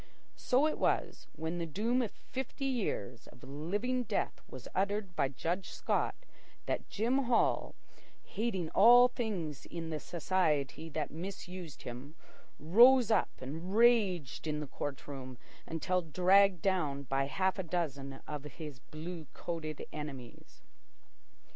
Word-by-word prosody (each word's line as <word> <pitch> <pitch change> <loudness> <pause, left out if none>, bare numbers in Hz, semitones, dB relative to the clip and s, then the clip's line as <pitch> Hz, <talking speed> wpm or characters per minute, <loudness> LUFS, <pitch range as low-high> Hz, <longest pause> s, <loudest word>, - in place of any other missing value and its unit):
So 260 +4 +3
it 310 - 0
was, - - 0
when 160 +2 -3
the 170 - -2
doom 225 - +1
of 230 - -1
fifty 265 +1 -6
years 195 - -2
of - - -16
living 195 - -1
death 225 -4 -2
was 130 -3 -9
uttered 200 -1 -1
by 145 -4 +2
Judge 165 +8 -3
Scott, - - 0 0.5
that - - -2
Jim 250 +6 +1
Hall, 240 -1 +2 0.5
hating 190 -6 -2
all 245 +4 +8
things 195 - -4
in 165 -1 -5
the 155 - -2
society 165 -3 0
that 155 -1 -3
misused 180 -1 -7
him, 125 +5 -8 0.4
rose 235 - +6
up 215 - +3
and 165 +9 -5
raged 200 - +3
in 150 -1 -1
the 150 - -3
court 140 0 -5
room 130 -3 -7 0.3
until 180 +3 0
dragged 185 +3 +4
down 155 -8 +1
by 135 +1 0
half 190 +6 0
a - - 0
dozen 140 -6 -3
of 150 -2 -5
his 150 -1 -8
blue 155 +5 -7
coated 160 -3 -5
enemies. 140 -5 -8
170 Hz, 135 wpm, -33 LUFS, 150-205 Hz, 0.5 s, all